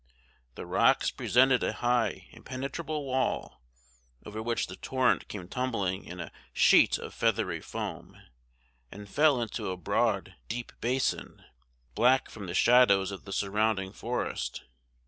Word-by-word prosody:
The - - -7
rocks - - +3
presented 130 +1 +3
a - - 0
high 120 0 0
impenetrable 140 +3 -5
wall, 130 - -2 0.6
over 105 +1 -6
which 115 +1 -1
the 95 - -9
torrent 130 +5 +1
came 90 -4 -7
tumbling 100 -6 -2
in 90 +1 -9
a 85 - -6 0.2
sheet - - +5
of - - -8
feathery - - 0
foam, - - -6 0.7
and 105 +1 -10
fell 145 +3 +3
into 115 -4 -3
a 95 - -3
broad 90 - 0
deep 120 - -5
basin, 130 +3 -1 0.5
black 125 +4 +3
from 100 -4 -8
the 90 - -4
shadows 100 -6 +5
of 100 - -8
the 100 - -9
surrounding 100 0 0
forest. 120 +3 -3
115 Hz, 135 wpm, -29 LUFS, 95-130 Hz, 0.7 s, sheet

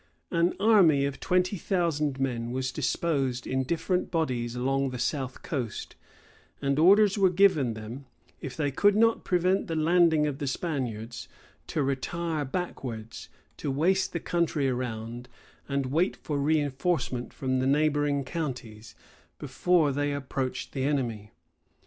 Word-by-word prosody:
An 170 +2 +2
army 190 -10 +5
of 140 -1 -4
twenty 185 +2 +1
thousand 150 -6 0
men 120 -3 -1
was 130 +1 -2
disposed 135 -3 -1
in 130 0 0
different 170 +6 -1
bodies 125 -8 -1
along 135 +2 0
the 125 - -5
south 130 0 -3
coast; 125 -8 -4 0.6
and 140 0 0
orders 200 +4 +5
were 190 -1 +5
given 175 - +3
them, 115 +5 -8 0.3
if 125 -2 -7
they 145 -2 0
could 205 +8 +3
not 225 +1 +3
prevent 185 +2 +1
the 165 - -2
landing 160 -1 +4
of 145 -2 -3
the 145 - -3
Spaniards, 125 -7 -3 0.4
to 150 - -1
retire 150 +4 -2
backwards, 130 -8 -5 0.3
to 145 - -3
waste 175 +8 +1
the 170 - -2
country 165 -5 0
around, 120 -1 -4 0.4
and 140 0 0
to 130 - -5
wait 165 +7 +1
for 145 -3 -3
reenforcement 145 -2 0
from 130 -1 -1
the 130 - +1
neighboring 145 0 +2
counties, 125 -8 -6 0.4
before 175 -5 +2
they 145 +1 -1
approached 135 -2 -3
the 135 - -3
enemy. 120 -7 -1
140 Hz, 145 wpm, -28 LUFS, 130-170 Hz, 0.6 s, army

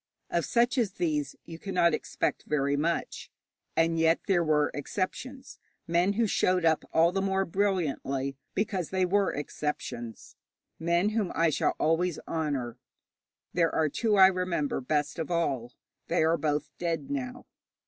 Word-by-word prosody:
Of - - +1
such 240 +2 +2
as 210 -6 0
these 150 -6 -1
you 165 -1 -9
cannot 180 -4 +2
expect - - -2
very 140 -1 +1
much. 165 +3 -2 0.5
And 165 0 +3
yet 165 +1 +4
there 175 -3 +3
were 150 -2 +2
exceptions 255 - -4 0.3
men 175 +4 +2
who 230 +2 +2
showed 185 -3 +2
up 160 -1 +3
all 165 +1 +4
the 195 +1 -1
more 195 0 +1
brilliantly 155 -8 -1 0.2
because 190 -4 -1
they 190 -1 +1
were 195 +2 +2
exceptions 140 -6 -5 0.4
men 170 +4 +2
whom 215 -4 -1
I 165 -1 +3
shall - - +1
always 165 +1 +1
honour. 140 -7 -2 0.7
There 170 -2 +3
were 155 -1 +2
two 215 - +1
I 190 - +9
remember 180 -7 0
best 150 +4 -1
of 160 - -3
all. 135 -8 -1 0.3
They 170 -1 +2
are 160 +1 +3
both 150 -1 -1
dead 165 -5 -2
now. 130 -3 -4
165 Hz, 150 wpm, -28 LUFS, 150-185 Hz, 0.7 s, I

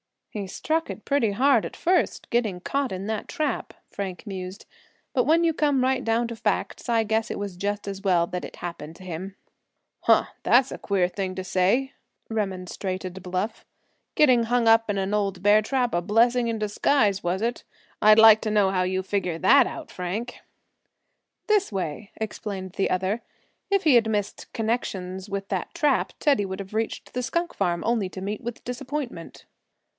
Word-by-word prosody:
"He 205 -2 -4
struck 320 - -1
it - - -7
pretty 240 -8 +2
hard 255 +1 +4
at - - -7
first, 360 +1 0
getting 215 -7 0
caught 275 +5 -1
in 190 +1 -5
that 215 0 -3
trap," 310 -3 -2 0.2
Frank 195 0 -5
mused; 190 -1 -7 0.5
"but 250 - +2
when 325 +4 +4
you 330 -1 +3
come 290 -4 +2
right 260 0 +1
down 230 +1 +1
to 235 - -5
facts 225 - -2
I 230 -1 +3
guess 220 +1 0
it - - -3
was 200 -3 -5
just 205 +2 -2
as 195 -1 -5
well 180 -4 +3
that 180 0 -4
it - - -10
happened 165 -2 -7
to 185 - -13
him." 185 +2 -6 0.6
"Huh! - - +4
that's 255 +2 +4
a - - -5
queer 190 -3 +1
thing 185 0 -4
to 185 - -4
say," 195 +9 +1 0.4
remonstrated 190 -2 -3
Bluff. 185 +4 -3 0.5
"Getting 255 -6 +5
hung 240 0 +1
up 225 0 +5
in 205 - 0
an 195 +1 -1
old 200 -3 -1
bear 205 +1 +6
trap 250 +2 0
a 175 - +1
blessing 235 +5 +3
in 230 -1 -1
disguise, 210 0 +2
was 180 +3 -1
it? 240 +1 -2 0.4
I'd 215 0 +7
like 220 -1 +9
to 220 - -2
know 205 -2 +3
how 185 -1 +1
you 185 +1 -1
figure 185 -4 -1
that 245 +9 +6
out, - - -8
Frank." 195 +7 -4 1.1
"This 420 -3 +2
way," 190 +1 -4
explained 200 -3 -5
the 195 - 0
other. 190 +5 0 0.5
"If 395 -1 +2
he 300 -5 +5
had 225 -2 +4
missed 205 -2 -3
connections 195 -4 -3
with 195 0 -4
that 190 - -3
trap 300 -5 +1
Teddy 275 -9 +3
would 190 +1 -5
have 195 +1 -10
reached 220 +1 -3
the 250 - -1
skunk 340 +8 -2
farm 175 -3 -1
only 225 -4 +1
to 185 - -8
meet 205 +2 -4
with 240 0 -6
disappointment." 250 - -6
210 Hz, 185 wpm, -25 LUFS, 190-240 Hz, 1.1 s, like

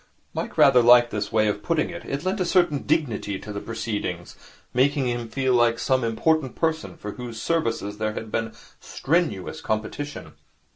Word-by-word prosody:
Mike - - -4
rather 125 - +7
liked 120 0 +6
this 105 0 -3
way 110 -1 +3
of 105 0 -1
putting 165 +3 0
it. 170 0 -8
It 140 +2 -4
lent 190 +3 -1
a - - +2
certain 175 -5 +2
dignity 105 -9 0
to 105 +2 -8
the 100 - -3
proceedings, 105 -6 -4 0.4
making 135 +2 +2
him 120 -1 -3
feel 130 +2 0
like 120 -1 +3
some 130 0 +1
important 130 +5 +1
person 160 -1 -2
for 105 - -6
whose 120 0 -7
services 115 -9 -1
there 110 0 -1
had 110 0 -6
been 115 0 -2 0.3
strenuous 155 - -1
competition. 125 +7 -4
120 Hz, 175 wpm, -24 LUFS, 110-150 Hz, 0.4 s, rather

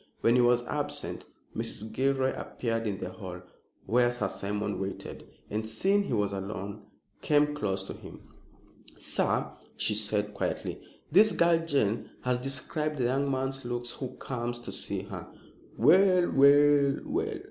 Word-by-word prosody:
When 115 - +4
he 125 - +5
was 120 0 +4
absent, - - -4 0.3
Mrs. 110 +2 -4
Gilroy 135 0 +1
appeared 115 -2 -3
in 100 -2 -2
the 90 - -5
hall 90 -2 -8 0.4
where 120 +1 +3
Sir 120 -5 -2
Simon 100 +1 -3
waited, 95 0 -6 0.2
and, 110 +1 -3
seeing 195 - +2
he - - -3
was 100 -2 +1
alone, 100 +1 -5 0.4
came 150 0 +3
close 95 -9 -1
to - - -7
him. - - -11 0.8
"Sir," - - 0 0.3
she 105 - +2
said 105 0 -1
quietly, - - -3 0.3
"this 210 +6 +7
girl 170 -1 +4
Jane 130 -9 0
has 125 -1 +1
described 145 +4 -1
the 130 - 0
young 135 +3 +1
man's 135 0 -2
looks 120 0 -3
who 130 0 -6
comes 120 -2 -4
to - - -7
see - - -4
her." - - -8 0.5
"Well! 180 - +5
well! 140 0 +6
well!" 395 +7 -2
120 Hz, 150 wpm, -29 LUFS, 105-145 Hz, 0.8 s, this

